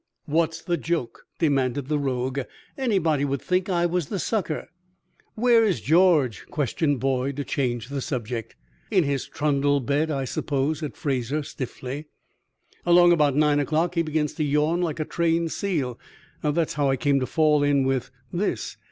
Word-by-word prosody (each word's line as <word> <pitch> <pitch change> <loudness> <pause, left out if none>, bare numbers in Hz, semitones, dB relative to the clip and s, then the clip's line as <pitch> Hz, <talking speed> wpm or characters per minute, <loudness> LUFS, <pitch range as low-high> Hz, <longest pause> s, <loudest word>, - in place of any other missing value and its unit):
"What's 165 +1 0
the 175 -1 0
joke?" 165 -5 -3
demanded 140 -4 +1
the 150 0 0
rogue. 130 -1 -1 0.4
"Anybody 185 - +1
would 140 -1 -1
think 185 +1 0
I 175 -2 +2
was 175 -3 0
the 200 - -3
sucker." 185 -4 -2 0.7
"Where 235 0 +4
is 200 -6 +1
George?" 160 - +3
questioned 145 0 0
Boyd, 135 +1 0
to 145 - -3
change 120 -4 -2
the 140 -1 -3
subject. 120 -3 -4 0.3
"In 190 -5 +3
his 140 -2 -1
trundle 145 -1 +1
bed, 140 +5 0
I 135 -3 -1
suppose," 140 +3 -1
said 150 -3 -6
Fraser, 140 +1 -1
stiffly. 135 +2 -6 0.8
"Along 175 0 +6
about 150 -5 +3
nine 150 -1 +3
o'clock 160 +4 0
he 170 - +2
begins 155 -2 -1
to 155 - -2
yawn 150 +4 +1
like 165 -3 -2
a 155 - -1
trained 165 0 0
seal. 150 - -2 0.4
That's 155 +2 0
how 145 -2 +1
I 135 - +3
came 140 +2 +2
to 130 - -2
fall 155 -2 +3
in 145 -1 +3
with 135 -1 0 0.2
this." 185 +4 -2
150 Hz, 165 wpm, -25 LUFS, 135-170 Hz, 0.8 s, Along